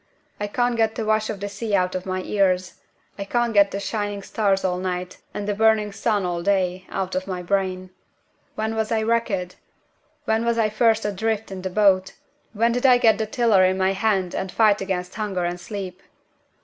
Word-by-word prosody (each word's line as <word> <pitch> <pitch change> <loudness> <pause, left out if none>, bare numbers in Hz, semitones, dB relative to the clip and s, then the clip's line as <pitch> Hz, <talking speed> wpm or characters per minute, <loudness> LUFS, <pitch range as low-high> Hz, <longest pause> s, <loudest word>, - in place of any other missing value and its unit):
"I 205 - -2
can't 245 +3 0
get 225 -1 +1
the 225 - -3
wash 215 0 +1
of 215 -3 -4
the 205 - -2
sea 205 +1 -2
out 185 -1 +1
of 185 0 -4
my 185 0 -2
ears. 185 -3 +1 0.5
I - - -2
can't 240 +3 0
get 200 -1 +5
the 200 - -4
shining 205 -1 -3
stars 195 -3 0
all 180 -1 0
night, 180 -1 -4
and 205 - -5
the 205 - +1
burning 215 0 +3
sun 205 -1 0
all 175 -1 -2
day, 185 -1 0
out 190 -1 -3
of 185 +1 -2
my 180 -2 -4
brain. 185 0 -1 0.6
When 220 +1 -2
was 220 0 -2
I 220 -1 +1
wrecked? 220 -6 -1 0.7
When 220 +1 +1
was 235 0 +1
I 220 -2 +2
first 225 0 +2
adrift 215 +1 -2
in 190 -1 -6
the 185 - -3
boat? 190 -1 +3 0.4
When 230 +2 +2
did 245 +1 -1
I 250 -1 +7
get 225 -3 +4
the 220 - -1
tiller 220 -4 +3
in 185 0 +2
my 190 0 +2
hand 195 -3 0
and 190 -1 -3
fight 215 -3 +3
against 185 -1 -3
hunger 200 -5 -2
and 175 0 -3
sleep? 190 -1 -7
200 Hz, 205 wpm, -23 LUFS, 185-220 Hz, 0.7 s, I